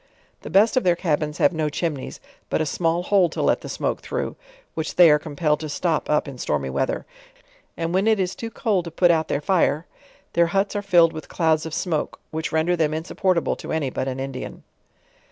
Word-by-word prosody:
The -, -, -8 dB
best 205 Hz, +6 st, +4 dB
of 255 Hz, -, +3 dB
their 175 Hz, -1 st, +3 dB
cabins 155 Hz, -3 st, -1 dB
have -, -, +3 dB
no 155 Hz, -2 st, -1 dB
chimneys, 150 Hz, -3 st, -4 dB, 0.3 s
but -, -, 0 dB
a 155 Hz, -, +1 dB
small 165 Hz, +2 st, 0 dB
hole 185 Hz, -2 st, +3 dB
to -, -, -7 dB
let -, -, +2 dB
the -, -, -8 dB
smoke -, -, -2 dB
through, -, -, -3 dB, 0.4 s
which 160 Hz, -1 st, -4 dB
they 175 Hz, -3 st, +8 dB
are 150 Hz, -, +4 dB
compelled 150 Hz, -1 st, -1 dB
to 155 Hz, -1 st, -5 dB
top 165 Hz, -4 st, 0 dB
up 150 Hz, 0 st, +2 dB
in 135 Hz, -3 st, -8 dB
stormy 70 Hz, -, -1 dB
weather; 130 Hz, -, -1 dB, 0.7 s
arid 165 Hz, 0 st, -2 dB
when 190 Hz, +3 st, +2 dB
it 220 Hz, -2 st, +3 dB
is 185 Hz, -1 st, 0 dB
too 230 Hz, -, -6 dB
cold 205 Hz, -6 st, 0 dB
to -, -, -5 dB
put 175 Hz, +2 st, +3 dB
out 160 Hz, -1 st, +1 dB
their 140 Hz, -, -1 dB
fire, 165 Hz, -2 st, +1 dB, 0.5 s
their 170 Hz, 0 st, +4 dB
huts 195 Hz, +4 st, 0 dB
are 205 Hz, -, 0 dB
filled 175 Hz, -5 st, +4 dB
with 155 Hz, -, -8 dB
clouds 160 Hz, -2 st, +1 dB
of 160 Hz, -, -8 dB
smoke, 160 Hz, -5 st, -2 dB
which 160 Hz, 0 st, -3 dB
render 160 Hz, +3 st, +2 dB
them 155 Hz, -2 st, 0 dB
insupportable 170 Hz, +2 st, 0 dB
to -, -, -7 dB
any 150 Hz, -5 st, -1 dB
but 130 Hz, -, -3 dB
an 130 Hz, 0 st, -3 dB
Indian. 135 Hz, -1 st, -6 dB
165 Hz, 215 wpm, -23 LUFS, 150-180 Hz, 0.7 s, they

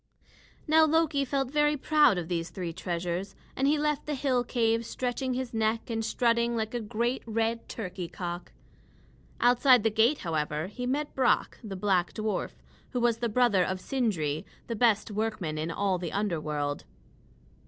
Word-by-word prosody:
Now 315 Hz, 0 st, +5 dB
Loki 315 Hz, -2 st, +2 dB
felt 270 Hz, -1 st, -1 dB
very 295 Hz, 0 st, +2 dB
proud 300 Hz, -7 st, +4 dB
of 170 Hz, -2 st, -3 dB
these 170 Hz, -1 st, -2 dB
three 175 Hz, -4 st, -5 dB
treasures, 175 Hz, +2 st, -3 dB, 0.2 s
and 270 Hz, -, +1 dB
left 300 Hz, -1 st, 0 dB
the 300 Hz, -, -1 dB
hill 255 Hz, -2 st, +1 dB
cave 230 Hz, -2 st, +1 dB
stretching 250 Hz, +2 st, -2 dB
his 255 Hz, -1 st, -4 dB
neck 225 Hz, +1 st, 0 dB
and 225 Hz, 0 st, -1 dB
strutting 235 Hz, +1 st, +1 dB
like 220 Hz, 0 st, -2 dB
a 240 Hz, -, -1 dB
great 235 Hz, +4 st, -1 dB
red 225 Hz, +1 st, -1 dB
turkey 185 Hz, -5 st, -5 dB
cock. 175 Hz, 0 st, -6 dB, 0.9 s
Outside 245 Hz, -1 st, +5 dB
the 225 Hz, -, +2 dB
gate, 225 Hz, +7 st, +3 dB
however, 155 Hz, -1 st, -1 dB
he 245 Hz, +6 st, -5 dB
met 290 Hz, +3 st, -1 dB
Brock, 260 Hz, -2 st, +1 dB
the 205 Hz, -3 st, -6 dB
black 185 Hz, -2 st, +1 dB
dwarf, 215 Hz, -1 st, -3 dB, 0.3 s
who 250 Hz, -, 0 dB
was 235 Hz, -1 st, +2 dB
the 235 Hz, -1 st, 0 dB
brother 220 Hz, -5 st, +3 dB
of 185 Hz, +1 st, -2 dB
Sindri, 185 Hz, -, -1 dB, 0.2 s
the 230 Hz, -, -4 dB
best 220 Hz, -2 st, +2 dB
workman 210 Hz, -7 st, -2 dB
in 160 Hz, +2 st, -2 dB
all 190 Hz, +1 st, 0 dB
the 175 Hz, -2 st, -4 dB
underworld. 155 Hz, -7 st, -2 dB
225 Hz, 165 wpm, -28 LUFS, 185-250 Hz, 0.9 s, Now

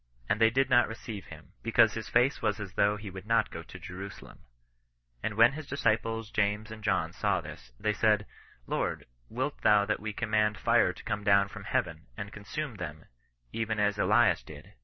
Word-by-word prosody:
And 105 Hz, -, 0 dB
they 110 Hz, -, +7 dB
did 135 Hz, +4 st, +2 dB
not 120 Hz, -1 st, +5 dB
receive 110 Hz, -2 st, -7 dB
him, 80 Hz, +3 st, -13 dB
because 115 Hz, 0 st, +4 dB
his 110 Hz, -1 st, -5 dB
face 130 Hz, +3 st, +3 dB
was 105 Hz, +1 st, 0 dB
as 100 Hz, -2 st, -6 dB
though 105 Hz, 0 st, +2 dB
he 105 Hz, -2 st, -8 dB
would 95 Hz, +2 st, -9 dB
fe 115 Hz, -1 st, +1 dB
to -, -, -10 dB
Jerusalem. 95 Hz, +2 st, -9 dB, 0.8 s
And 105 Hz, -, -2 dB
when 115 Hz, +4 st, +6 dB
his 155 Hz, -1 st, -7 dB
disciples 115 Hz, -4 st, 0 dB
James 105 Hz, +1 st, 0 dB
and 110 Hz, -1 st, -9 dB
ohn -, -, +1 dB
saw -, -, +1 dB
this, -, -, -10 dB
they 105 Hz, -, +1 dB
said,' 105 Hz, 0 st, +2 dB, 0.4 s
Lord, -, -, -2 dB, 0.2 s
wilt 130 Hz, +5 st, -3 dB
thou 105 Hz, -1 st, +5 dB
that 110 Hz, -, -1 dB
we 110 Hz, +1 st, -4 dB
com 110 Hz, +1 st, -4 dB
mand 105 Hz, -1 st, +2 dB
fire -, -, +3 dB
to -, -, -13 dB
come 105 Hz, -, -3 dB
down 100 Hz, -1 st, +4 dB
from -, -, -9 dB
Heaven, 80 Hz, +1 st, -2 dB
and 100 Hz, -1 st, -6 dB
consume 115 Hz, +4 st, -5 dB
lAiem, 80 Hz, -4 st, -7 dB, 0.5 s
even 110 Hz, -1 st, -1 dB
as 105 Hz, 0 st, +1 dB
Elias -, -, +4 dB
did -, -, -13 dB
105 Hz, 195 wpm, -30 LUFS, 100-115 Hz, 0.8 s, they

